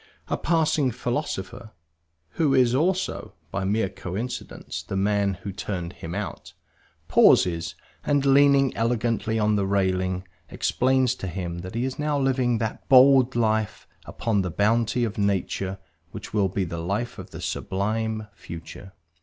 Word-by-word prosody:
A - - +1
passing 155 -4 +1
philosopher 120 -3 -4 0.6
(who 145 -4 +1
is 125 -2 +4
also, 180 +7 0 0.2
by 100 - -2
a - - -2
mere 105 +1 +1
coincidence, 95 +6 -6
the - - -6
man 100 0 +1
who 100 - -4
turned 90 -2 -5
him 85 +2 -7
out) 105 0 -6 0.5
pauses, 85 -1 +4 0.3
and 145 -1 +1
leaning 140 -1 +5
elegantly 115 -1 0
on 105 -1 +2
the 100 -1 0
railings, 95 -2 0 0.3
explains 130 0 +1
to 95 - -6
him 85 -2 -4
that 90 +5 -8
he 120 +2 0
is 130 +1 -4
now 150 -1 0
living 130 -3 +1
that 110 0 -4
bold 130 -1 +6
life 110 -2 0 0.2
upon 110 -4 -1
the 90 - -2
bounty 115 +6 +1
of 110 -1 -3
nature 95 -1 -1 0.3
which - - -9
will 100 -3 +2
be 95 +1 -1
the 85 -1 -4
life 105 +8 -3
of - - -9
the - - -9
sublime 110 +3 -2
future. 90 +1 -10
110 Hz, 150 wpm, -25 LUFS, 95-125 Hz, 0.6 s, bold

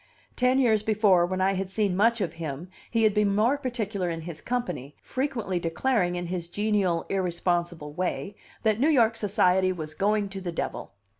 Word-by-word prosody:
Ten 250 +1 +3
years 225 -5 +3
before, 205 -5 +3
when 185 +1 -2
I 195 +1 +3
had 190 0 -3
seen 200 -2 0
much 230 +3 +3
of 170 -5 -1
him, 155 +3 -5 0.2
he 230 -1 +1
had 215 -2 +4
been 205 -1 +2
more 230 +6 +3
particular 220 -9 -3
in 165 -1 -4
his 160 -1 -8
company, 150 - -3
frequently 235 -9 -2
declaring 180 +2 0
in 175 0 -3
his 175 -1 -4
genial, 200 -3 0
irresponsible 175 -4 -1
way 185 +4 -2 0.3
that 220 -1 +2
New 290 +5 +3
York 230 -7 +4
society 190 -3 +2
was 155 -4 -6
going 205 +4 +1
to 195 0 -6
the 180 -2 -4
devil. 170 - -4
195 Hz, 180 wpm, -27 LUFS, 175-220 Hz, 0.3 s, had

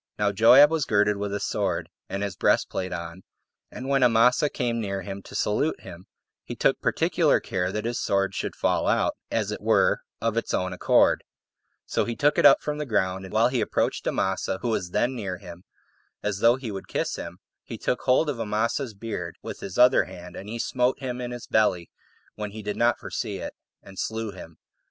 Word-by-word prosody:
Now 105 -1 +1
Joab 125 +8 +7
was 160 -3 0
girded 105 -1 +2
with 100 0 -3
a 100 - -2
sword, - - -1 0.2
and 100 +1 -3
his 100 -3 -3
breastplate 95 +1 +1
on; 85 +1 -6 0.5
and 130 - -8
when 135 -1 +2
Amasa 125 +4 +4
came 120 -4 -2
near 100 -2 -3
him 100 +1 -6
to - - -12
salute 125 +9 0
him, 90 +2 -11 0.4
he - - -7
took - - +1
particular - - +2
care 90 0 -2
that 105 +2 -3
his 120 +1 -2
sword 100 0 +1
should - - -4
fall - - 0
out, - - +2
as - - -1
it - - -5
were, - - +3 0.2
of 115 0 -1
its 115 - 0
own 95 0 -1
accord: 90 - +3 0.6
so - - 0
he 120 - -3
took 145 +4 +2
it - - +8
up 140 - +5
from 150 0 -3
the 150 - -2
ground, 95 -4 0
and 95 - -10
while 115 +3 +4
he 125 -2 0
approached 105 - -1
Amasa, 95 0 -1
who 120 - 0
was 90 -6 -1
then 120 +7 0
near 95 -6 -4
him, 85 +1 -12 0.6
as 105 -2 -2
though 115 +3 +5
he 130 -4 -6
would 95 -1 -7
kiss - - -2
him, - - -7 0.3
he - - -7
took 125 - -1
hold 130 +5 +3
of 140 -5 -2
Amasa's 115 +3 -1
beard 100 -5 -5
with - - -7
his 95 - -7
other 125 -5 +6
hand, 90 0 -11
and 100 - -8
he 115 - -4
smote 125 +2 0
him 125 -2 -4
in 120 - -4
his 120 -1 -7
belly 90 -6 +1 0.4
when 105 -1 -5
he 105 +1 -9
did 105 0 -3
not 120 +1 +2
foresee - - -4
it, - - -6 0.3
and 95 -1 -11
slew 110 -1 -3
him. 85 -4 -12
105 Hz, 210 wpm, -25 LUFS, 95-125 Hz, 0.6 s, it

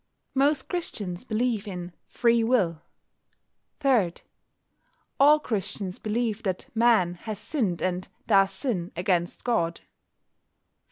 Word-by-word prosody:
Most 275 0 +2
Christians 205 - -4
believe 225 -2 -1
in 180 -2 -6
Free 235 -1 +2
Will. 190 -10 +2 1.0
3. 245 - +3 1.1
All 295 +2 +7
Christians 200 -6 -3
believe 225 0 -1
that 190 -4 -2
Man 225 -6 +4
has 215 +4 -6
sinned 210 - -2
and 185 0 -1 0.2
does 195 -3 +5
sin 190 -3 -3
against 175 0 0
God. 170 -9 0
210 Hz, 105 wpm, -26 LUFS, 180-240 Hz, 1.1 s, All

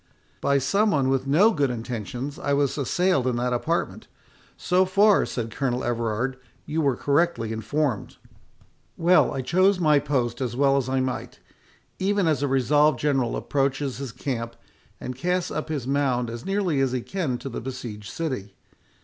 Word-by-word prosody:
"By 140 - +3
some 195 +11 +2
one 140 -8 +2
with 135 0 0
no 180 +11 +5
good 145 -9 +1
intentions 120 - -5
I 140 -5 -1
was 140 -1 +1
assailed 150 0 +1
in 125 - +1
that 125 +1 0
apartment. 165 +8 -2 0.5
So 180 +1 +2
far," 200 +2 +4
said 115 -2 -4
Colonel 125 0 -1
Everard, 120 +2 -1 0.3
"you 160 +2 -1
were 140 -4 +2
correctly 140 -5 +1
informed." 120 +2 -2 0.8
"Well, 175 +2 +4
I 135 - -2
chose 185 +6 +3
my 150 -4 +4
post 130 -4 -1
as 120 -3 -2
well 135 +1 +3
as 135 -2 0
I 130 0 +1
might, 130 -1 -4 0.6
even 200 0 +1
as 150 -4 +1
a 145 - +1
resolved 145 +3 +3
general 135 -5 0
approaches 135 -1 -1
his 135 -4 -5
camp, 115 -2 -4 0.4
and 125 - -5
casts 180 +6 -1
up 155 +1 -4
his 145 -6 -3
mound 130 -3 0
as 115 +6 -7
nearly 195 -8 +1
as 130 -2 +1
he 125 - -1
can 155 -6 -2
to 135 - -8
the 120 - -5
besieged 115 -5 -7
city. 130 -12 -4
135 Hz, 170 wpm, -25 LUFS, 125-155 Hz, 0.8 s, no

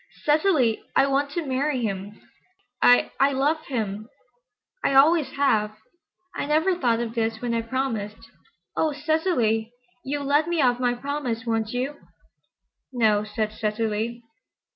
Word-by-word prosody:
"Cecily, 295 - +3
I 270 - +5
want 275 +1 0
to 340 -1 -2
marry 265 -1 -1
him. 200 0 -4 0.6
I—I—love 275 +5 +3
him. 215 -4 -3 0.7
I 275 - +1
always 305 +2 +5
have. 215 -7 +1 0.6
I - - -3
never 320 +5 +2
thought 240 -9 +1
of 235 -1 -3
this 225 -1 -1
when 240 0 -2
I 230 - +1
promised. 230 -4 -3 0.6
Oh, 315 -2 +1
Cecily, 290 - 0 0.3
you'll 285 +1 -3
let 290 +3 +2
me 345 -1 -1
off 250 -3 +3
my 245 -1 +1
promise, 250 -3 -3
won't 225 -2 -1
you?" 255 +5 -3 0.9
"No," 220 -4 +2
said 215 0 -3
Cecily. 220 +2 -2
245 Hz, 130 wpm, -24 LUFS, 225-285 Hz, 0.9 s, I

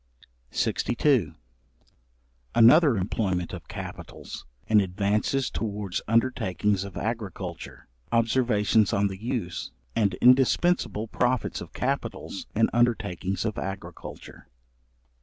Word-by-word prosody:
§62. 120 - +1 1.2
Another 130 +2 +7
employment 95 -2 -1
of - - -8
capitals, - - -8 0.2
in 105 -1 +5
advances 105 +7 0
towards 105 -4 -3
undertakings 105 -4 +1
of 100 -2 -8
agriculture. 110 -4 -5 0.2
Observations 115 -3 +2
on 100 0 +2
the 95 +1 -8
use, 115 -8 -3 0.3
and 105 -3 +2
indispensable 125 -1 +3
profits 125 +2 0
of - - -9
capitals 95 - -3
in 110 +1 +4
undertakings 105 -5 0
of 110 -2 -2
agriculture. 95 0 -8
110 Hz, 95 wpm, -26 LUFS, 100-120 Hz, 1.2 s, Another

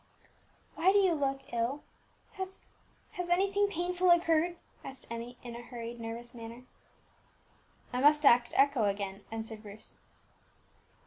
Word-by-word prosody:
"Why 360 +4 +4
do 405 - +4
you 380 -3 +4
look 275 -3 -2
ill? 240 +5 -1 0.5
Has 380 0 -6 0.5
has 360 -1 -5
anything 395 +3 +3
painful 360 0 0
occurred?" 345 0 +4 0.3
asked 270 0 -9
Emmie, 235 +1 -6
in 240 -1 -7
a 240 - -7
hurried, 235 -1 -7
nervous 230 +2 -6
manner. 230 +1 -9 1.3
"I 250 - 0
must 295 +1 +5
act 240 -2 +6
echo 275 -5 +4
again," 200 0 -2
answered 225 -1 -6
Bruce. 210 0 -10
265 Hz, 130 wpm, -31 LUFS, 230-345 Hz, 1.3 s, act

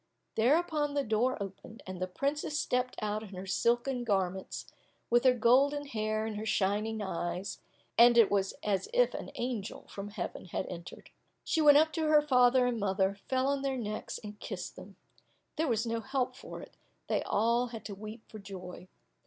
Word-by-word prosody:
Thereupon 295 +4 +2
the 285 - +2
door 235 +3 +1
opened, 200 +3 -8
and 185 -1 -7
the 185 - 0
princess 285 +9 -2
stepped 250 0 0
out 210 0 -1
in 200 -3 -9
her 185 +1 -6
silken 240 +6 +1
garments, 190 -4 -1 0.5
with 240 +2 +4
her 255 -1 +6
golden 275 +5 +4
hair 215 -4 -1
and 220 -1 -4
her 215 - -4
shining 210 +2 0
eyes, 180 0 -3 0.4
and 240 0 +8
it 230 -3 +6
was 195 -1 +1
as 195 -3 0
if - - +4
an - - -5
angel 240 -5 -4
from 200 0 -6
heaven 200 -3 -5
had 185 +1 -3
entered. 170 -1 -9 0.3
She 320 - +1
went 290 -1 +8
up 315 +1 +4
to 320 -2 0
her 300 -1 +5
father 250 -2 +5
and 245 -2 0
mother, 195 0 +1
fell 260 0 +2
on 280 0 +1
their 270 -1 -1
necks 215 -3 -4
and 210 0 -8
kissed - - -6
them; - - -12 0.6
there 320 -1 0
was 230 -2 +1
no 230 0 -1
help 255 +1 -2
for - - -9
it, - - -13 0.3
they - - 0
all 235 +3 +2
had 230 -2 -8
to 205 - -5
weep 215 +3 -9
for 215 - -10
joy. 185 -2 -9
225 Hz, 185 wpm, -31 LUFS, 200-260 Hz, 0.6 s, and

